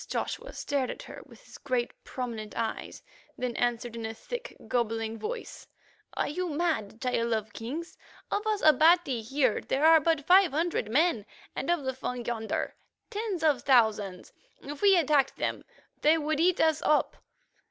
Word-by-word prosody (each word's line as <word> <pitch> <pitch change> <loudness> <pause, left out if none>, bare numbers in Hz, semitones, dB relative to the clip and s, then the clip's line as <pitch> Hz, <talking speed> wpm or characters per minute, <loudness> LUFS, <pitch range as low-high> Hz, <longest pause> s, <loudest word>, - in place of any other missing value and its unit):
The - - -9
prince - - -13
Joshua - - -3
stared 275 -3 -1
at - - -6
her - - -10
with - - -17
his - - -13
great, 255 -4 -1
prominent 230 -4 -6
eyes, 230 -1 -4 0.3
then 250 -2 -3
answered 240 -1 -1
in 230 - -6
a 225 0 -4
thick, - - -7
gobbling 225 -2 -1
voice: 460 +2 -6 0.5
"Are - - 0
you 360 +4 -3
mad, 295 -10 -1
Child 235 -2 0
of 220 -1 -3
Kings? 295 +10 -6 0.3
Of 415 +2 -1
us 425 -2 0
Abati 310 -3 +5
here 255 +1 +1
there 280 +3 0
are 320 0 +8
but 315 -2 0
five 370 -3 +6
hundred 320 -8 -1
men, 260 - +2 0.3
and - - -3
of 345 -4 +1
the 260 0 -2
Fung 250 -2 -5
yonder 225 -2 -2 0.4
tens 410 -6 -3
of 295 -6 +3
thousands. 215 -8 +2 0.3
If 290 +1 -7
we 395 -2 +6
attacked, 300 -5 +2 0.6
they 310 +2 +5
would 310 -1 -1
eat 355 +2 +3
us 315 -1 +3
up. 305 - +2
275 Hz, 170 wpm, -28 LUFS, 230-330 Hz, 0.6 s, are